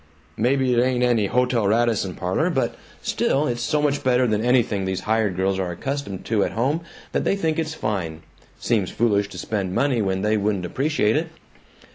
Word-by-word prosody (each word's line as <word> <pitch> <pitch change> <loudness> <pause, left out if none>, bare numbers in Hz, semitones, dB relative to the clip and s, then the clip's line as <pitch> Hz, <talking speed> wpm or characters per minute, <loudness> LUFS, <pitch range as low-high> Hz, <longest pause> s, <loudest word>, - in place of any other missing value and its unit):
"Maybe 130 +2 +2
it 120 - +4
ain't 125 -1 +1
any 115 -5 +2
Hotel 125 -2 +1
Radisson 110 -4 +1
parlor, - - 0
but - - 0 0.3
still, 145 +3 +1
it's 120 -3 -2
so 150 +4 0
much 145 -1 +1
better 125 0 +3
than 110 -2 0
anything 120 -5 +2
these 95 0 -2
hired 110 -2 +1
girls 95 +1 0
are 90 -2 -1
accustomed 100 0 -4
to 110 -3 +1
at - - -2
home 135 +8 0 0.3
that - - 0
they - - +2
think 165 -4 -1
it's 160 0 -2
fine. 85 - -3 0.4
Seems 105 -6 0
foolish 100 -3 +1
to - - -10
spend 95 -4 -3
money 135 -5 +2
when 95 -1 -1
they 105 +1 +2
wouldn't 100 -3 0
appreciate 130 - +1
it." 160 +2 0
115 Hz, 190 wpm, -23 LUFS, 100-130 Hz, 0.4 s, it